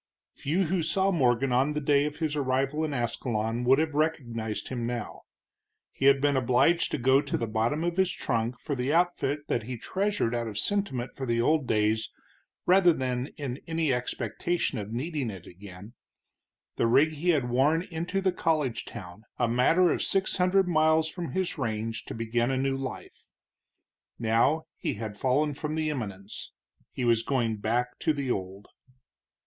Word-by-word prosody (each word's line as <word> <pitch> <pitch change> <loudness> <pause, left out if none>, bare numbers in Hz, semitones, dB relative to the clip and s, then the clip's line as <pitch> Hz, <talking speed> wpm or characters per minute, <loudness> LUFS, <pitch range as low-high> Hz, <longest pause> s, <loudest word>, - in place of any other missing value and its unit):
Few 165 +7 0
who 180 +1 0
saw 190 +5 +1
Morgan 130 -5 +2
on 130 +4 +2
the 150 - -1
day 145 0 +3
of 150 0 -3
his 155 -2 -1
arrival 135 +2 0
in 155 - -1
Ascalon 120 -2 -2
would 130 +2 +5
have 160 0 0
recognized 120 -8 -2
him 120 -3 -3
now. 120 -3 -5 0.7
He 135 - -2
had 140 0 +6
been 145 0 +2
obliged 130 +7 +3
to - - -2
go 130 +2 +4
to 140 - -2
the 115 - -2
bottom 115 +8 0
of 175 +1 -1
his 190 -1 +3
trunk 115 +1 -2
for 150 - -4
the 130 +1 -1
outfit 155 -4 +1
that 120 - 0
he 120 +3 -6
treasured 195 - -1
out 120 -1 -1
of 105 -2 -5
sentiment 130 - -1
for 135 - -5
the 115 0 +1
old 150 +2 +2
days 110 +1 +1 0.5
rather 180 -1 +6
than 130 -2 -2
in 140 -3 -5
any 160 -4 +1
expectation 125 +4 -2
of 105 +1 -6
needing 140 +1 -2
it 95 -4 -8
again 95 +3 -12 0.8
the - - +2
rig 145 +7 +4
he 155 +4 -2
had 145 -7 +2
worn 145 +7 +3
into 180 +1 -3
the 190 -1 +2
college 155 -9 0
town, 95 -3 -9 0.2
a - - +2
matter 160 +10 +4
of - - 0
six 195 0 +1
hundred 185 +1 +3
miles 160 -1 +3
from 170 0 -6
his 185 -4 -2
range, 115 -2 -3
to - - -7
begin 115 +1 0
a 135 - 0
new 135 +1 0
life. 135 -1 -7 0.9
Now 115 +8 +2
he - - -2
had 105 -1 -5
fallen 140 +6 +1
from 150 +2 -4
the 155 -1 0
eminence. 100 -8 -6 0.4
He 125 - -3
was 115 -1 +3
going 115 -3 0
back 120 +4 -1
to 155 - +1
the 140 -3 -2
old. 95 0 -4
135 Hz, 180 wpm, -28 LUFS, 115-160 Hz, 0.9 s, had